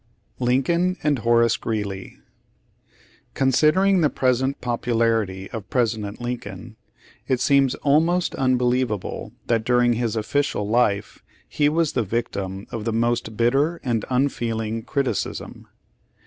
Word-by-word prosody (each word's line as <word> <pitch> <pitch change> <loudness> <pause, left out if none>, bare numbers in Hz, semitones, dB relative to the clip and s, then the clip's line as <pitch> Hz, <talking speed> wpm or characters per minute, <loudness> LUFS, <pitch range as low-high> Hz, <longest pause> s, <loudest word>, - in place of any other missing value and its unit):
LINCOLN 170 +9 +1
AND 145 -3 +2
HOEACE 115 0 +3
GREELEY 100 -4 -4 1.2
Considering 155 +8 +3
the 150 - +3
present 130 +1 0
popularity 115 -5 0
of 110 -4 -7
President 110 -4 -1
Lincoln, 115 -3 -6 0.5
it 130 -2 +1
seems 135 -1 +3
almost 165 +5 +2
unbelievable 125 -4 0
that 115 -2 +1
during 120 0 +3
his 115 -1 -1
official 110 -1 -1
life 105 -3 0 0.3
he 145 -1 +1
was 160 0 +1
the - - +1
victim 100 -3 -3
of 115 - -4
the 115 - -1
most 115 -1 -1
bit 120 +1 +3
ter 150 +6 +1
and 115 -4 -1
unfeeling 115 -4 -1
criticism. 135 +3 -3
120 Hz, 120 wpm, -23 LUFS, 110-135 Hz, 1.2 s, HOEACE